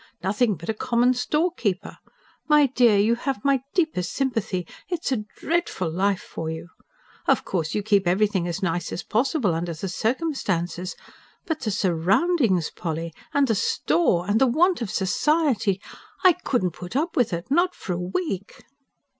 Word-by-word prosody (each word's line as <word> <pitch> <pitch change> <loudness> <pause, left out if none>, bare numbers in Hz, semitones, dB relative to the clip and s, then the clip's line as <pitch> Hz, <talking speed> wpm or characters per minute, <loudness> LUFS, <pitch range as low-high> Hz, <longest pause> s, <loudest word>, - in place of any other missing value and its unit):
Nothing 210 +3 +2
but 170 +1 -10
a 220 - +1
common 240 +3 +2
storekeeper. 250 - -1 0.5
My 300 -1 +6
dear, 245 -5 +4
you 210 +3 +4
have 250 -1 -3
my 275 -2 +3
deepest 315 - 0
sympathy. 225 -9 -1 0.2
It's 345 -5 -2
a 215 -5 -1
DREADFUL 320 - -1
life 195 +3 0
for 160 - -5
you. 160 +1 -6 0.6
Of - - +3
course 165 -4 -2
you 210 - 0
keep 200 -3 +2
everything 190 -1 +2
as 175 +3 -4
nice 175 -1 -1
as - - -4
possible, 245 - +1
under 165 +1 -3
the 175 +5 -4
circumstances. 190 - -2 0.5
But 320 -2 -2
the 235 - -2
surroundings, 190 - +2
Polly!... 165 -1 -4 0.2
and 285 -1 +3
the 225 - +2
store... 170 -2 +1
and 210 +4 +2
the 265 - +6
want 335 +6 +3
of 225 - -2
society. 225 - +1 0.4
I 370 -2 +8
couldn't 245 - -1
put 180 +6 -9
up 320 +5 0
with 245 -6 +2
it, 170 +8 -4
not 350 +4 +3
for 185 - -4
a 175 - -3
week!" 195 - -4
210 Hz, 165 wpm, -24 LUFS, 180-275 Hz, 0.6 s, I